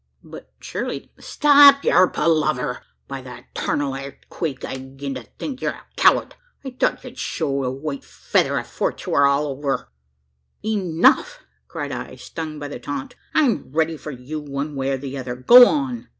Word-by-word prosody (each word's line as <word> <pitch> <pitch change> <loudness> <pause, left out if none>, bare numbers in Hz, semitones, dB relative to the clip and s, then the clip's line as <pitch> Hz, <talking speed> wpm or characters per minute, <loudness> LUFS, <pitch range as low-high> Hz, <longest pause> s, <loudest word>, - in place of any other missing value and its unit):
"But - - -12
surely - - -5
" - - -25
"Stop 285 -1 +7
yur 185 +2 +5
palaver! 155 -7 0 0.3
By 135 -1 -6
the 125 -2 -11
tarnal 140 -2 -1
airthquake, 135 +1 -6
I'll 130 0 -8
'gin 140 0 -5
to 130 - -6 0.2
think 260 -3 -6
you - - -2
air - - 0
a - - -40
coward! - - +3 0.3
I 265 - -5
thort 250 - -1
ye'd - - -10
show, 140 -4 -2
the 130 - -1
white 140 +2 -5
feather - - 0
afore - - -2
'twur 140 0 +2
all 140 +2 +2
over!" 135 - -3 0.8
"Enough!" 210 - +2 0.3
cried - - -5
I, - - -6
stung 160 -2 -7
by 145 -1 -6
the 145 - -7
taunt; 145 -2 -6 0.2
"I 310 - +5
am 225 - 0
ready 160 +2 +1
for 155 - -9
you 140 +3 -6
one 145 0 -5
way 135 0 -1
or 135 - 0
the 135 0 -6
other. 125 -1 -5
Go 240 - +9
on." 265 -5 -2
145 Hz, 180 wpm, -22 LUFS, 135-170 Hz, 0.8 s, Go